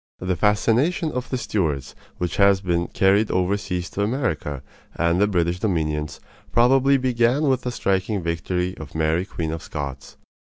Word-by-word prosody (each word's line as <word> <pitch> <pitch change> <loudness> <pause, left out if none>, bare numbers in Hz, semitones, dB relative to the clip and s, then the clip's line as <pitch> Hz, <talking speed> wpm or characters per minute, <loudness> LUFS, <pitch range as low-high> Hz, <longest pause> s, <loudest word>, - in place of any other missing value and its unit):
The 90 0 -2
fascination 115 - +2
of 125 0 -4
the 130 - -1
Stuarts, 80 - -2 0.2
which 90 -2 -3
has 100 -1 +5
been 85 -2 -1
carried 100 +3 +2
overseas 90 -1 -1
to 100 - -3
America 100 - -2 0.3
and 85 +3 +1
the 105 - +4
British 90 -2 0
dominions, 75 -7 -1 0.3
probably 135 +3 +4
began 125 +2 +1
with 130 -3 +2
the 125 - -3
striking 100 -2 -1
history 90 +2 -2
of 80 0 -10
Mary 80 +3 +1
Queen 80 -5 -4
of 80 0 -4
Scots. 70 -3 -7
95 Hz, 155 wpm, -23 LUFS, 85-115 Hz, 0.3 s, has